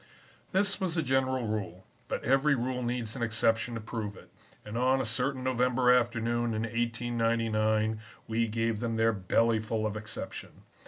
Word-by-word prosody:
"This 200 Hz, +1 st, +2 dB
was 180 Hz, -3 st, -1 dB
the 165 Hz, -, +1 dB
general 130 Hz, -2 st, +1 dB
rule, 95 Hz, -4 st, -4 dB, 0.2 s
but -, -, -3 dB
every 135 Hz, +3 st, +3 dB
rule 125 Hz, 0 st, -2 dB
needs 120 Hz, -2 st, -2 dB
an 130 Hz, -, -5 dB
exception 115 Hz, +1 st, +1 dB
to -, -, -3 dB
prove 105 Hz, -2 st, -5 dB
it, -, -, -15 dB, 0.3 s
and 105 Hz, +1 st, -7 dB
on 130 Hz, +2 st, +3 dB
a 130 Hz, -, -1 dB
certain 130 Hz, +3 st, -1 dB
November 125 Hz, 0 st, +3 dB
afternoon 120 Hz, -1 st, +1 dB
in 110 Hz, -, -1 dB
1899 115 Hz, -2 st, 0 dB, 0.3 s
we 115 Hz, +1 st, +1 dB
gave 115 Hz, 0 st, -1 dB
them 115 Hz, -1 st, -2 dB
their 115 Hz, 0 st, +3 dB
belly 110 Hz, +4 st, +2 dB
full 110 Hz, 0 st, -2 dB
of 105 Hz, -1 st, -2 dB
exception. 105 Hz, 0 st, -7 dB
115 Hz, 165 wpm, -30 LUFS, 110-125 Hz, 0.3 s, every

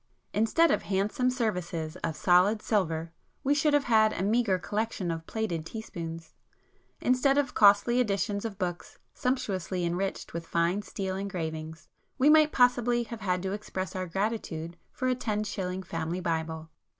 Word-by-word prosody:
Instead 225 Hz, +11 st, +3 dB
of -, -, +2 dB
handsome 205 Hz, +6 st, 0 dB
services 180 Hz, -10 st, -2 dB
of 160 Hz, -, -3 dB
solid 185 Hz, +6 st, +4 dB
silver, 165 Hz, -6 st, 0 dB, 0.3 s
we 280 Hz, -, +3 dB
should 295 Hz, +1 st, +2 dB
have 290 Hz, -, +3 dB
had 220 Hz, -3 st, +4 dB
a -, -, -2 dB
meagre 215 Hz, -2 st, +2 dB
collection 205 Hz, -2 st, -2 dB
of 165 Hz, 0 st, -5 dB
plated 200 Hz, -8 st, -2 dB
teaspoons; 165 Hz, -4 st, -7 dB, 0.7 s
instead 255 Hz, +2 st, +3 dB
of 280 Hz, -3 st, +1 dB
costly 205 Hz, +4 st, +5 dB
editions 205 Hz, -2 st, 0 dB
of 220 Hz, -4 st, -5 dB
books 180 Hz, -3 st, -4 dB, 0.2 s
sumptuously 190 Hz, -8 st, -1 dB
enriched 180 Hz, +3 st, -2 dB
with 165 Hz, 0 st, -5 dB
fine 170 Hz, +5 st, +1 dB
steel 190 Hz, -2 st, -4 dB
engravings, 160 Hz, -5 st, -5 dB, 0.3 s
we 285 Hz, +4 st, +5 dB
might 310 Hz, -1 st, +6 dB
possibly 245 Hz, -1 st, +3 dB
have 230 Hz, -1 st, -8 dB
had 180 Hz, -2 st, 0 dB
to 190 Hz, -, -2 dB
express 190 Hz, -2 st, -4 dB
our 185 Hz, -1 st, -2 dB
gratitude 175 Hz, -4 st, -3 dB, 0.2 s
for 255 Hz, -, -2 dB
a 255 Hz, -, +3 dB
ten 215 Hz, -4 st, -2 dB
shilling 190 Hz, -3 st, -3 dB
Family 165 Hz, 0 st, -3 dB
Bible. 160 Hz, -2 st, -3 dB
195 Hz, 155 wpm, -29 LUFS, 170-225 Hz, 0.7 s, might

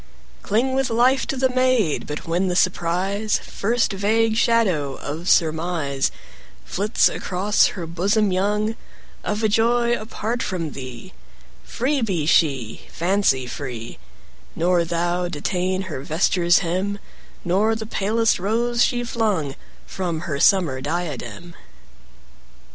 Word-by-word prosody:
Cling 240 Hz, +6 st, 0 dB
with 265 Hz, 0 st, +1 dB
life 250 Hz, +4 st, +3 dB
to 270 Hz, -, -2 dB
the 260 Hz, 0 st, +2 dB
maid; 255 Hz, -, +1 dB
But 150 Hz, 0 st, -5 dB
when 175 Hz, +3 st, 0 dB
the 180 Hz, -, -1 dB
surprise, 185 Hz, +4 st, 0 dB
35 -, -, -14 dB
First 230 Hz, +1 st, 0 dB
vague 220 Hz, +3 st, +1 dB
shadow 190 Hz, -, +2 dB
of 160 Hz, +5 st, -5 dB
surmise, 160 Hz, -4 st, +1 dB, 0.6 s
Flits 205 Hz, +4 st, +2 dB
across 195 Hz, +3 st, +1 dB
her 175 Hz, -, -4 dB
bosom 195 Hz, +5 st, +1 dB
young, 210 Hz, +4 st, 0 dB, 0.5 s
Of 210 Hz, +1 st, -2 dB
a -, -, +5 dB
joy 235 Hz, +3 st, +2 dB
apart 230 Hz, +1 st, -3 dB
from 170 Hz, -6 st, -3 dB
thee, 130 Hz, -4 st, -9 dB, 0.5 s
Free 270 Hz, +3 st, -1 dB
be 185 Hz, -9 st, -1 dB
she, 135 Hz, -8 st, +1 dB
fancy 170 Hz, -7 st, +1 dB
free; 125 Hz, -3 st, -7 dB, 0.6 s
Nor 175 Hz, +1 st, +2 dB
thou 175 Hz, +1 st, -1 dB
detain 180 Hz, +3 st, -2 dB
her 155 Hz, -8 st, -6 dB
vesture's 175 Hz, +3 st, +2 dB
hem, 185 Hz, +4 st, -1 dB
40 200 Hz, -, -8 dB, 0.5 s
Nor 205 Hz, +6 st, +2 dB
the 220 Hz, 0 st, -5 dB
palest 220 Hz, +1 st, +1 dB
rose 235 Hz, +5 st, +1 dB
she 245 Hz, -1 st, 0 dB
flung 210 Hz, -, -1 dB, 0.3 s
From 170 Hz, -, -3 dB
her 155 Hz, -5 st, -3 dB
summer 155 Hz, -7 st, +3 dB
diadem. 155 Hz, -1 st, -4 dB
185 Hz, 130 wpm, -22 LUFS, 165-220 Hz, 0.6 s, a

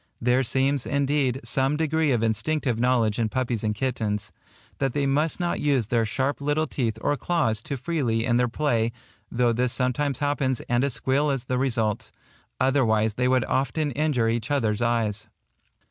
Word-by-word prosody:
There 125 Hz, +2 st, +2 dB
seems, 135 Hz, +1 st, 0 dB
indeed, 140 Hz, -2 st, +1 dB
some 135 Hz, +2 st, +1 dB
degree 160 Hz, -1 st, +1 dB
of 120 Hz, -3 st, +1 dB
instinctive 120 Hz, +2 st, 0 dB
knowledge 120 Hz, -3 st, +2 dB
in 110 Hz, -2 st, +1 dB
puppies 120 Hz, -1 st, -2 dB
and 105 Hz, -1 st, 0 dB
kittens, 105 Hz, -4 st, -2 dB, 0.5 s
that 135 Hz, -2 st, 0 dB
they 145 Hz, -1 st, 0 dB
must 150 Hz, +5 st, +1 dB
not 175 Hz, -1 st, -1 dB
use 140 Hz, -6 st, +1 dB
their 115 Hz, 0 st, +1 dB
sharp 135 Hz, +6 st, -1 dB
little 145 Hz, +2 st, +1 dB
teeth 115 Hz, -8 st, -2 dB
or 145 Hz, -, +1 dB
claws 145 Hz, -10 st, 0 dB
too 140 Hz, +4 st, -5 dB
freely 125 Hz, -6 st, -1 dB
in 120 Hz, -1 st, +2 dB
their 125 Hz, 0 st, +2 dB
play, 120 Hz, -3 st, 0 dB, 0.4 s
though 120 Hz, -1 st, +2 dB
this 125 Hz, +1 st, 0 dB
sometimes 130 Hz, +1 st, 0 dB
happens 145 Hz, -3 st, 0 dB
and 120 Hz, +1 st, 0 dB
a 140 Hz, -, +1 dB
squeal 135 Hz, +3 st, +1 dB
is 135 Hz, -3 st, -1 dB
the 125 Hz, -1 st, -2 dB
result; 115 Hz, -5 st, -1 dB, 0.5 s
otherwise 115 Hz, -5 st, +2 dB
they 125 Hz, +3 st, 0 dB
would 130 Hz, -2 st, +2 dB
often 140 Hz, +3 st, 0 dB
injure 140 Hz, -4 st, +1 dB
each 115 Hz, 0 st, -1 dB
other's 115 Hz, -6 st, 0 dB
eyes. 115 Hz, -2 st, -1 dB
125 Hz, 175 wpm, -25 LUFS, 115-140 Hz, 0.5 s, There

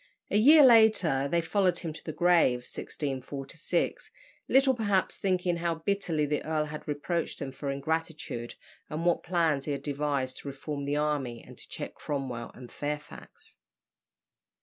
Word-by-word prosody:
A -, -, +3 dB
year 295 Hz, +6 st, +8 dB
later 215 Hz, -, +5 dB
they 170 Hz, +2 st, +2 dB
followed 180 Hz, 0 st, +1 dB
him 165 Hz, -3 st, -4 dB
to -, -, -11 dB
the 155 Hz, -, -4 dB
grave 165 Hz, -8 st, +3 dB
(1646), 140 Hz, -, -4 dB, 0.4 s
little 265 Hz, 0 st, +5 dB
perhaps 205 Hz, -5 st, 0 dB
thinking 180 Hz, -2 st, 0 dB
how 170 Hz, -1 st, -1 dB
bitterly 165 Hz, -3 st, -1 dB
the 150 Hz, 0 st, -1 dB
earl 155 Hz, -1 st, 0 dB
had 150 Hz, 0 st, -8 dB
reproached 155 Hz, +3 st, -2 dB
them 135 Hz, -, -5 dB
for 140 Hz, +1 st, -5 dB
ingratitude, 150 Hz, -4 st, -3 dB, 0.3 s
and 155 Hz, +3 st, -3 dB
what 175 Hz, -, +3 dB
plans 165 Hz, -6 st, +1 dB
he 145 Hz, -, -1 dB
had 140 Hz, -, -5 dB
devised 140 Hz, -3 st, -2 dB
to -, -, -9 dB
reform 140 Hz, +1 st, -5 dB
the 145 Hz, +1 st, 0 dB
army 145 Hz, -6 st, -1 dB
and -, -, -13 dB
to -, -, -12 dB
check -, -, -6 dB
Cromwell 130 Hz, -5 st, -4 dB
and 125 Hz, -1 st, -11 dB
Fairfax. 150 Hz, +1 st, -7 dB
150 Hz, 155 wpm, -29 LUFS, 140-175 Hz, 0.4 s, year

